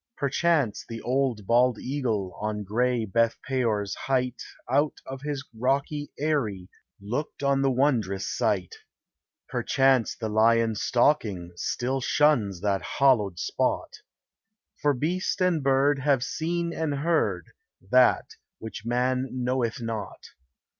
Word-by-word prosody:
Perchance 140 -3 +1
the 115 0 -5
bald 130 -3 0
old 120 0 +4
eagle 115 -9 -2
On 105 -1 -2
gray 120 +3 0
Beth 115 +3 +1
peor's 115 -6 0
height 125 -2 -1 0.3
Out 145 +4 +1
of 135 0 -7
his 145 -2 -4
rocky 140 +5 -1
eyry 115 -12 -1 0.3
Looked 120 +9 -4
on 140 0 +2
the 135 - +3
wondrous 120 -8 +1
sight; 95 -4 -1 0.7
Perchance 135 -3 +2
the 110 - -4
lion 115 +1 +3
stalking 105 -7 +1
Still 130 +8 -2
shuns 120 - +2
that 100 -2 0 0.2
hallowed 110 -10 +3
spot; - - -1 0.9
For 145 -1 +2
beast 170 +8 -1
and 180 -4 +2
bird 140 +1 +3
have 135 -2 +2
seen 170 +3 -2
and 160 -3 -1
heard 140 - 0 0.4
That 125 -1 +5 0.3
which 110 -1 -8
man 125 +2 0
knoweth 125 -1 -1
not. 110 -3 -5
125 Hz, 120 wpm, -26 LUFS, 110-140 Hz, 0.9 s, That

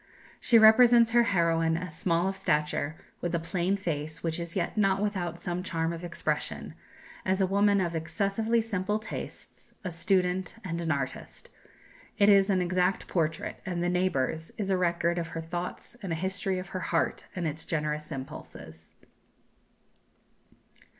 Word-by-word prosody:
She 235 - +5
represents 230 +1 +7
her 240 0 +6
heroine 165 -6 +2
as 175 -2 -6
small 170 +1 +1
of 195 - -2
stature, 150 -2 0 0.3
with 175 0 -1
a - - +1
plain 175 +3 0
face, 155 -4 -4
which 165 0 -1
is 170 0 -5
yet 180 - -1
not 195 -2 +3
without 185 -5 -2
some 175 +1 -3
charm 165 -2 -1
of 170 +1 -7
expression, 170 -1 -3 0.5
as 190 +1 +1
a 190 - +4
woman 200 +1 +3
of 175 -2 0
excessively 210 +7 0
simple 210 -1 -1
tastes, 215 - -9
a 185 - -3
student, 180 +1 0
and 170 -2 -3
an 165 - -2
artist. 135 -2 -4 0.7
It 200 0 +5
is 195 0 +6
an 185 -2 +3
exact 180 +1 +1
portrait; 165 -2 -1
and 175 -2 -2
"The 175 - +1
Neighbours" 165 -4 0
is 195 -2 -1
a - - +4
record 170 -1 +1
of 165 - -3
her 165 0 -5
thoughts 175 +7 -5
and 190 -4 -4
a - - +1
history 190 +2 -1
of 185 0 -6
her 185 - -4
heart 170 -2 -1
and 175 -2 -2
its 155 +1 -3
generous 150 -1 -2
impulses. 80 - -8
175 Hz, 165 wpm, -29 LUFS, 165-195 Hz, 0.7 s, represents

